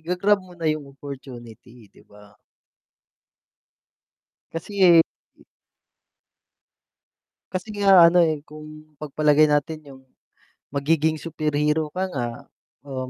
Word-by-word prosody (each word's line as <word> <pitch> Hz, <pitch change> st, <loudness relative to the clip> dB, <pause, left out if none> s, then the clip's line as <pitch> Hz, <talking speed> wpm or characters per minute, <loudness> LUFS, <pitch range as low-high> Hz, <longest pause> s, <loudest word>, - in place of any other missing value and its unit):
ga-grab 180 Hz, +5 st, +1 dB
mo 180 Hz, -1 st, -16 dB
na 170 Hz, -, -8 dB
yung 155 Hz, -2 st, -1 dB
opportunity, 125 Hz, -4 st, -11 dB
'di -, -, -20 dB
ba? 105 Hz, 0 st, -18 dB, 2.2 s
Kasi 195 Hz, +5 st, -4 dB
eh, 170 Hz, -3 st, +7 dB, 0.4 s
i -, -, -22 dB, 2.1 s
Kasi 185 Hz, +3 st, -5 dB
nga 190 Hz, -4 st, +6 dB
ano, 180 Hz, -, +2 dB
eh, 155 Hz, -2 st, -2 dB
kung 155 Hz, 0 st, -13 dB
pagpalagay 150 Hz, +1 st, +2 dB
natin 150 Hz, +1 st, 0 dB
yung 135 Hz, -1 st, -14 dB, 0.7 s
magiging 155 Hz, +2 st, 0 dB
superhero 150 Hz, -1 st, -1 dB
ka 185 Hz, -, -2 dB
nga, 125 Hz, -3 st, -2 dB, 0.6 s
oo, 130 Hz, -2 st, -6 dB
155 Hz, 105 wpm, -23 LUFS, 140-170 Hz, 2.2 s, eh